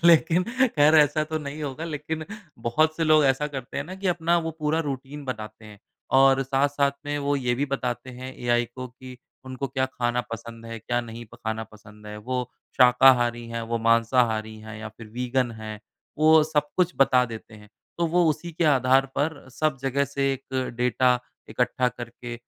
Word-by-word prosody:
लेकिन 170 +1 +5 0.3
ख़ैर 150 +2 +6
ऐसा 155 0 +4
तो 155 - -1
नहीं 150 0 -6
होगा 145 +3 -4
लेकिन 155 0 -4 0.3
बहुत 155 +8 +1
से 165 - 0
लोग 155 -1 +5
ऐसा 135 +2 +2
करते 135 -4 -7
हैं 145 - -2
ना 185 +3 -8
कि 190 0 -5
अपना 170 0 +2
वो 165 -1 -3
पूरा 155 +2 +1
रूटीन 140 +2 -6
बनाते 110 -3 -6
हैं 105 -1 -13 0.4
और 135 0 +5
साथ-साथ 140 +1 +1
में 145 0 -1
वो 145 - +2
ये 125 -2 0
भी 140 - 0
बताते 125 -1 -3
हैं 130 +1 -8
एआई 120 0 +1
को 130 0 -6
कि 125 +1 -12 0.3
उनको 130 +1 -4
क्या 130 0 0
खाना 120 -1 -1
पसंद 115 0 -8
है? 115 0 -6
क्या 120 +2 -1
नहीं 115 0 -8
प - - -11
खाना 110 -1 -4
पसंद 105 -1 -16
है? 105 0 -7
वो 125 +3 -3 0.3
शाकाहारी 125 -2 +5
हैं, 115 0 -4
वो 115 +1 -2
मांसाहारी 115 -1 +2
हैं 110 0 -9
या 110 - -6
फिर 110 +1 -13
वीगन 125 0 0
हैं, 110 -1 -7 0.4
वो 155 0 +6
सब 150 -1 0
कुछ 180 -1 +2
बता 130 -2 +4
देते 110 -2 -9
हैं 105 -1 -15 0.3
तो 170 - +2
वो 175 +2 +3
उसी 160 +3 -4
के 170 +2 -1
आधार 135 -2 +4
पर 150 +1 0 0.2
सब 155 -2 0
जगह 140 +1 +1
से 140 0 -1
एक 130 -1 -4
डाटा 125 0 +3 0.3
इकट्ठा 125 0 +1
करके 120 0 -8
130 Hz, 190 wpm, -25 LUFS, 120-150 Hz, 0.4 s, ख़ैर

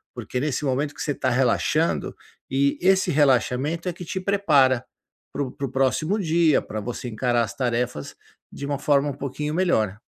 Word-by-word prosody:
porque 125 - -4
nesse 145 +1 -2
momento 140 +2 -1
que - - -8
você 145 - -1
tá 130 -1 -1
relaxando, 130 +6 +1 0.3
e 140 +1 +1
esse 190 +1 +3
relaxamento 145 +4 +1
é 175 - -4
que 175 0 -9
te 190 - -3
prepara, 150 -11 +3 0.5
para 145 - -1
o 130 - -5
para 140 +1 -4
o - - -10
próximo 135 +9 +1
dia, 165 -4 +3
pra 110 - -6
você 120 +2 -5
encarar 120 +1 +1
as - - -5
tarefas 120 - -2 0.4
de 140 - -7
uma 140 -1 -2
forma 145 0 +2
um - - -3
pouquinho 150 +3 -4
melhor. 110 - +1
140 Hz, 185 wpm, -24 LUFS, 125-155 Hz, 0.5 s, esse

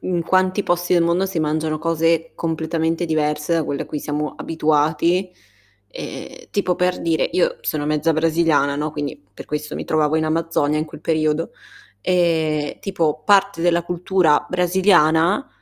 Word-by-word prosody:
in 175 -2 -1
quanti 185 +3 +1
posti 175 -1 0
del 175 -1 +4
mondo, 170 +3 +1
si 185 -4 -2
mangiano 155 0 -1
cose 165 0 0
completamente 165 +1 -2
diverse 150 0 0
da 165 -2 +1
quelle 140 - -3
a - - -10
cui 150 - -4
siamo 150 +1 -3
abituati, 160 +4 +1
e - - -31 0.6
e - - -9
tipo, 195 -3 0
per 180 0 0
dire, 165 -1 +1
io 180 - +1
sono 150 -1 -2
mezza 155 +2 +1
brasiliana, 160 -3 +2
no, 150 +1 -2
quindi 145 -1 -5
per - - -11
questo 150 0 -4
mi - - -5
trovavo 155 0 +1
in 160 - +1
Amazzonia 155 -2 0
in 155 - -1
quel 155 - -12
periodo, 155 0 0 0.5
ehm, 160 -4 0
tipo 170 -6 -1
parte 200 -3 +3
della 170 0 +2
cultura 175 -3 +1
brasiliana 180 - +3
165 Hz, 160 wpm, -20 LUFS, 155-175 Hz, 0.6 s, del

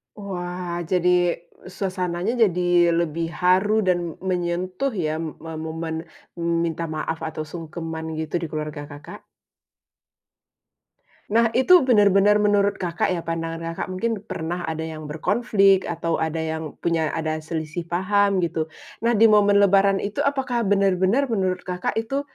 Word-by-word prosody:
Wah, 180 -3 -5
jadi 180 -1 +3 0.6
suasananya 185 0 -2
jadi 180 -4 +1 0.4
lebih 165 0 -1 0.2
haru 195 +4 +3
dan 175 -3 0
menyentuh 180 +6 -1 0.2
ya 155 - 0 0.3
me 165 - -7
momen 160 +1 -4 0.6
minta 170 0 -2
maaf 160 +1 -3
atau 155 0 -5
sungkeman 165 -1 -6
gitu 160 +1 -3
di 165 - -4
keluarga 150 -1 -4
Kakak. 145 +1 -11 2.1
Nah, 230 0 +4
itu 355 +8 +6
benar-benar 210 -4 +5
menurut 205 -1 +2
Kakak 175 -2 -1
ya 175 -2 -2
pandangan 165 0 -3 0.2
Kakak, - - -5
mungkin 215 +3 -2
pernah 175 -3 -4
ada 160 -1 -3
yang 155 -2 -7
berkonflik, 195 +3 +3
atau 165 -1 -1
ada 160 0 -1
yang 160 -1 -4
punya 165 -2 0
ada 155 0 -2
selisih 155 +1 -4
paham, 200 +2 +2
gitu. 160 -1 -3 0.3
Nah, 230 0 +2
di 225 - +6
momen 205 -2 +5
lebaran 195 0 +4
itu 200 +1 -2
apakah 265 -4 0
benar-benar 195 +4 +2
menurut 190 -7 -1
Kakak 180 +2 -3
itu 235 +5 -1
180 Hz, 135 wpm, -23 LUFS, 165-205 Hz, 2.1 s, itu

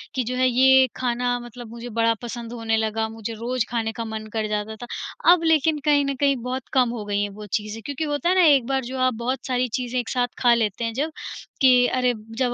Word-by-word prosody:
कि 255 - +1
जो 250 +2 -3
है 255 0 +3
ये 260 +1 +5
खाना 245 0 0
मतलब 240 0 -10
मुझे 235 +1 -8
बड़ा 230 0 +4
पसंद 235 -1 -6
होने 225 -1 -1
लगा, 220 0 -1
मुझे 225 0 -6
रोज़ 235 +2 -2
खाने 225 -2 -1
का 230 0 -5
मन 220 0 -6
कर 220 -1 -1
जाता 210 +1 -3
था। - - -17 0.5
अब 340 -2 0
लेकिन 315 -1 +3
कहीं 290 -1 +4
न 275 - -2
कहीं 280 -1 +4
बहुत 255 0 -4
कम 255 -2 +4
हो 230 -3 -4
गईं 205 0 -1
हैं 205 - -2
वो 210 - -9
चीज़ें, 215 +2 -8
क्योंकि 285 +2 -3
होता 295 +3 -1
है 370 - +3
ना 370 - +5
एक 280 -6 +5
बार 270 -1 0
जो 260 +2 -5
आप 255 0 +2
बहुत 255 +1 -2
सारी 250 0 0
चीज़ें 250 0 -2
एक 240 - -4
साथ 245 -1 +1
खा 240 -1 +5
लेते 220 -2 0
हैं 230 - -3
जब 300 +6 -2 0.5
कि 260 -1 +7
अरे, 250 -1 +1 0.2
जब 250 -2 +1
245 Hz, 245 wpm, -23 LUFS, 225-265 Hz, 0.5 s, कि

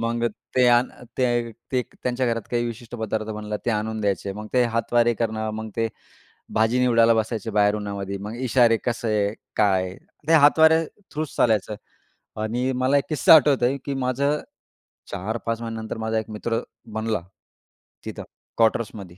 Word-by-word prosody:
मग 115 0 -1 0.3
ते 125 - +5
आण 120 +1 +4 0.3
ते 120 -2 +1 0.2
ते 130 -1 +2
त्यांच्या 125 +1 -2
घरात 115 -2 0
काही 120 -1 0
विशिष्ट 120 0 -8
पदार्थ 110 -1 -2
बनलं, 105 -1 -4
ते - - +3
आणून 110 0 -2
द्यायचे. 100 -1 -1
मग 105 +2 -7
ते 125 -1 +4
हातवारे 120 0 +2
करणं 110 -1 -2
मग 110 0 -5
ते 115 -1 +1 0.7
भाजी 110 +3 +2
निवडायला 115 -2 +5
बसायचे 110 0 -2
बाहेर 105 0 +3
उन्हामध्ये. 100 -1 -4
मग 105 +3 -6
इशारे 120 -2 +3
कसे 110 -4 0 0.2
काय. 95 -3 +2 0.3
ते - - +4
हातवारे 160 +1 +6 0.3
थ्रू 155 +1 -1
चालायचं 110 -2 +2 0.7
आणि 120 +4 -1
मला 135 +2 +3
1 140 - +1
किस्सा 155 +1 +7
आठवतोय 140 -3 +4
की 140 - -2
माझं 140 +4 +1 0.7
4-5 110 +4 -3
महिन्यानंतर 115 -1 -5
माझा 110 0 -1
1 110 - -7
मित्र 115 +2 -2 0.4
बनला 110 -3 -1 0.8
तिथं - - -6 0.3
क्वार्टर्समध्ये. 105 -5 0
115 Hz, 150 wpm, -24 LUFS, 110-125 Hz, 0.8 s, किस्सा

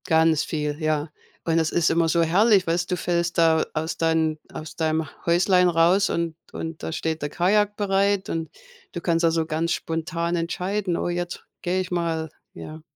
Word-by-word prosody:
Ganz 160 -1 +3
viel, 150 0 -3
ja. 155 0 0 0.3
Und 165 0 +2
es 160 -1 0
ist 170 -2 +2
immer 165 0 +2
so 170 +1 +3
herrlich, 195 +4 +4
weißt, 175 +2 0
du 180 - +1
fällst 170 0 -1
da 165 -1 +4
aus 160 +1 -3
deinen 160 -1 +1 0.2
aus 155 0 -8
deinem 160 -1 0 0.2
Häuslein 180 +1 +4
raus 175 +4 +3
und 170 -1 -2 0.2
und 160 -1 -6
da - - -3
steht 160 0 -2
der 145 - -2
Kajak 205 +5 +2
bereit 200 -1 +1
und 165 -1 -3 0.4
du 175 - -6
kannst, 170 0 +1
also, 165 -1 +2
ganz 165 +1 -1
spontan 165 +1 -2
entscheiden: 180 +2 -2
„Oh, - - -2
jetzt 175 0 -4 0.2
gehe 180 +1 0
ich 185 0 -7
mal,“ 165 -2 -1 0.2
ja. 155 +1 -9
165 Hz, 180 wpm, -24 LUFS, 160-180 Hz, 0.4 s, herrlich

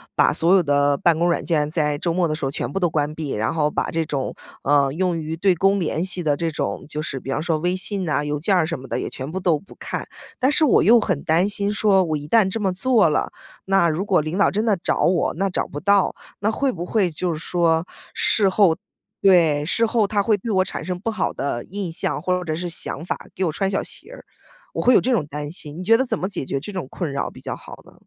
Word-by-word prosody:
把 - - +4
所 170 +3 +3
有 195 - +6
的 145 -2 +2
办 170 +1 +3
公 170 +2 +2
软 170 - 0
件， 150 -3 0
在 150 -3 0
周 170 +3 -1
末 175 0 +1
的 155 - -2
时 155 - -4
候 135 - -1
全 - - -4
部 195 - -2
都 175 - +2
关 150 -1 -1
闭， 155 -3 -4
然 110 +1 -1
后 150 -2 0
把 - - -1
这 165 0 -1
种， 140 -4 -3 0.3
呃， 140 -1 +3
用 180 0 0
于 160 0 -4
对 180 +2 +2
公 195 +4 +2
联 170 0 -1
系 185 -1 -1
的 150 -4 +1
这 165 -1 -1
种 150 - -3
就 150 0 -4
是 140 -3 -4
比 135 - -6
方 135 - -1
说 160 -1 0
微 175 +4 0
信 195 0 -2
呐、 150 -2 0
邮 150 0 -2
件 190 +6 +1
儿 165 -3 +2
什 165 -4 -4
么 135 - -10
的 - - -2
也 - - -3
全 135 +3 -7
部 190 - -3
都 175 -4 +2
不 195 - -15
看。 - - -5 0.3
但 260 +2 +2
是 315 +2 +5
我 290 - +4
又 235 +3 +6
很 185 -9 -1
担 170 +5 +2
心 205 0 0
说， 205 -2 +3
我 160 -3 -1
一 145 0 -5
旦 225 +3 +4
我 - - -1
这 225 - -3
么 195 -2 +1
做 215 0 +3
了， 150 - 0 0.3
那 195 -3 +3
如 165 +5 -2
果 190 -5 +3
领 155 +5 -4
导 200 - +3
真 210 +2 0
的 215 -4 +2
找 170 - -1
我， 175 0 +2
那 195 +4 -1
找 185 - -1
不 145 - -6
到， 200 +2 +2 0.2
那 210 +2 +1
会 270 +4 0
不 175 -4 -5
会 195 -1 +1
就 170 +2 -2
是 155 - -5
说 165 -1 +1 0.3
事 205 -3 +3
后 190 -4 +3 0.4
对， 165 -6 +4
事 230 +7 +2
后 225 -2 +2
他 205 0 +1
会 210 +1 +2
对 225 +4 -5
我 190 -2 +3
产 - - -6
生 180 -1 -3
不 225 - -3
好 215 -5 -1
的 135 -4 -3
印 195 -2 -5
象， 160 - -2
或 180 +2 0
者 155 -1 -2
是 175 +2 -4
想 160 -2 -4
法， - - -2 0.2
给 190 - -2
我 165 - 0
穿 195 +5 -1
小 195 - 0
鞋 - - -7
儿， - - -11 0.5
我 - - -2
会 250 - +5
有 - - +6
这 260 - 0
种 210 - +1
担 145 0 -6
心， 155 -2 -5
你 - - -5
觉 225 +4 +5
得 265 - +1
怎 - - -1
么 190 - -2
解 190 -9 -3
决 135 - -2
这 165 +9 -8
种 185 -9 -5
困 170 -6 -4
扰 140 - -2
比 - - -14
较 - - -4
好 - - -12
呢？ - - -17
175 Hz, 295 characters per minute, -22 LUFS, 155-195 Hz, 0.5 s, 有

